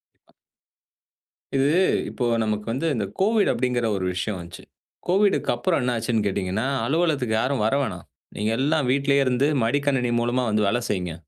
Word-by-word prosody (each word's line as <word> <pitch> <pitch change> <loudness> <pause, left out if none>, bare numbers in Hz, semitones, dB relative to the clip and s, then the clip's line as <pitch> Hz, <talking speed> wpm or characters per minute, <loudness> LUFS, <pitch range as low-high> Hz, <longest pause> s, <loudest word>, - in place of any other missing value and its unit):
கண்டிப்பா. - - -33 1.3
இது 135 +2 +3 0.4
இப்போ 125 - -3 0.2
நமக்கு 105 0 -2
வந்து 135 +8 -1
இந்த 105 -4 -1 0.2
கோவிட் 215 +1 +3
அப்படிங்கிற 125 0 -1
ஒரு 95 - -3
விஷயம் 95 +2 -3
வந்துச்சு. 85 -1 -10 0.4
கோவிட்க்கு 195 +3 +2
அப்புறம் 185 -5 0
என்ன 125 0 0
ஆச்சுன்னு 115 -1 0
கேட்டீங்கன்னா, 100 +3 -2 0.2
அலுவலகத்துக்கு 145 -7 +1
யாரும் 130 -3 0
வர 110 - +1
வேணாம். 95 -9 -4 0.3
நீங்க 105 +2 -1
எல்லாம் 150 +1 +1
வீட்டிலேயே 140 +1 +2
இருந்து 130 +2 +2 0.2
மடிக்கணினி 130 0 +1
மூலமா 120 +2 0
வந்து 105 0 +1
வேலை 120 +4 +1
செய்யுங்க. 90 -4 -2
125 Hz, 155 wpm, -23 LUFS, 105-140 Hz, 1.3 s, இது